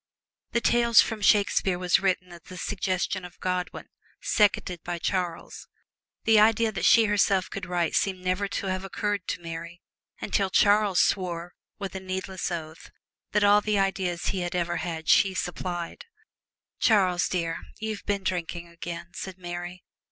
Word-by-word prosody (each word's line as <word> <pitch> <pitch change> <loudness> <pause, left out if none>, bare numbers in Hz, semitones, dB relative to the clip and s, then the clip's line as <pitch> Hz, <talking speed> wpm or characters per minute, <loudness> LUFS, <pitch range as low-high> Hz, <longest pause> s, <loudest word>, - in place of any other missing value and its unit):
The 235 - +2
"Tales 235 -1 +4
from 220 -2 +2
Shakespeare" 200 -3 +3
was 180 -1 +3
written 185 -2 0
at 170 -1 -14
the 185 - -10
suggestion 185 -1 -2
of 180 - -11
Godwin, 180 -1 -3 0.3
seconded 185 -4 +1
by 175 0 -3
Charles. 175 -1 -3 0.6
The 225 -1 +5
idea 220 +1 +4
that 200 - -2
she 230 -1 +6
herself 200 -2 +2
could 195 - -5
write 175 -2 0
seemed 190 -2 0
never 185 +2 0
to 200 - -4
have 185 0 -2
occurred 200 0 -2
to - - -3
Mary, 170 +1 -7 0.4
until 195 -2 0
Charles 205 -1 +4
swore 175 -2 0 0.2
with 195 -2 -5
a 190 - -4
needless 185 0 -4
oath 160 -2 -6 0.4
that 210 0 +3
all 205 0 +6
the 210 -1 0
ideas 190 -3 0
he 185 -2 -1
ever 175 0 -1
had 160 -2 -4
she 190 -1 +4
supplied. 175 -1 -4 0.7
"Charles, 185 -5 +3
dear, 165 -2 -2 0.2
you've 220 -2 -4
been 200 -1 0
drinking 170 -1 -3
again!" 170 +1 -7
said 190 -1 -7
Mary. 175 0 -7
185 Hz, 155 wpm, -26 LUFS, 175-200 Hz, 0.7 s, she